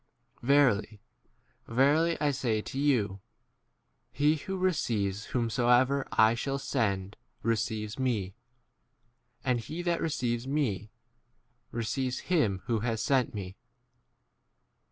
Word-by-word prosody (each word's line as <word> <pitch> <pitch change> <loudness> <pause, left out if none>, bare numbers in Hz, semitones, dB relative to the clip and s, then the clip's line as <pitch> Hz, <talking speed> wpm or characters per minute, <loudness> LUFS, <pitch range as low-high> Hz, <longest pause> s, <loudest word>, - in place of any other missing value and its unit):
Verily, 120 -6 +3 0.7
verily, 145 +8 +3
I 145 -1 +2
say 125 -5 0
to 130 +5 -5
you, 115 -9 +1 0.9
He 150 +2 +2
who 190 +5 -5
re 185 0 +2
ceives 105 - -1
whomsoever 125 +3 +2
I 110 +1 +5
shall 135 +4 -2
send 105 -8 -1 0.3
receives 110 0 -1
me; 110 -8 -1 1.1
and 125 -2 +2
he 160 +10 -6
that 175 -1 0
receives 120 -5 -1
me 120 -8 -1 0.8
receives 125 +3 -2
him 100 - +2
who 115 -2 0
has 115 0 -1
sent 130 -6 +1
me. 95 -2 -6
120 Hz, 110 wpm, -29 LUFS, 110-140 Hz, 1.1 s, I